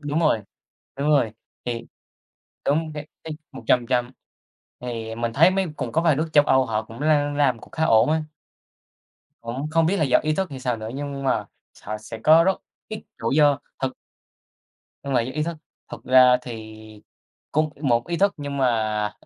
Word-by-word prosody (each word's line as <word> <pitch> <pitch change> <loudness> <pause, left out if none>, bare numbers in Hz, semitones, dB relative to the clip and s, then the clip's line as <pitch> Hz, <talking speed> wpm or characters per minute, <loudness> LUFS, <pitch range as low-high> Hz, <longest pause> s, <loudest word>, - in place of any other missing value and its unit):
đúng 150 +2 -1
rồi. 150 -9 +2 0.5
Đúng 140 +2 -1
rồi, 135 -8 +3 0.3
thì 120 -1 -4 0.8
đúng 155 +2 0
cái 150 0 -7 0.2
cái 160 - -5 0.2
100% 125 0 +1 0.7
thì 115 -2 -5
mình 115 0 -2
thấy 165 +6 +6
mấy 190 0 0
cũng - - -4
có 165 - +2
vài 160 -4 +3
nước 160 +3 -1
châu 145 -1 +6
Âu 130 -3 +3
họ 110 -1 -1
cũng 115 +3 -12
l - - -2 0.3
làm 130 -5 +2
cũng - - -15
khá 160 - -1
ổn 115 +1 +4
á. 160 0 +1 1.2
Cũng 120 +5 -4
không 165 0 +3
biết 195 +4 +1
là 155 - +2
do 130 - +4
ý 155 0 +1
thức 190 -1 -2
hay 135 -2 -7
sao 125 -2 -1
nữa 110 0 -6
nhưng 140 -1 -5
mà - - +1 0.4
họ 105 +1 -4
sẽ 110 +1 -9
có 160 +2 +7
rất 190 0 +2 0.3
ít 215 - -5 0.2
rủi 125 +6 0
do 145 -2 +5 0.2
thực 130 - 0 1.1
Nhưng 140 - -3
mà 120 - +3
những 130 +3 -6
ý 155 - 0
thức, 165 +1 -3 0.4
thực - - -8
ra 125 -1 +6
thì 110 -3 -8 0.8
cũng 155 +1 +2
một 120 -5 +1
ý 175 - -2
thức 200 +3 +2
nhưng 145 -1 -5
mà 110 -5 0
135 Hz, 190 wpm, -23 LUFS, 115-155 Hz, 1.2 s, có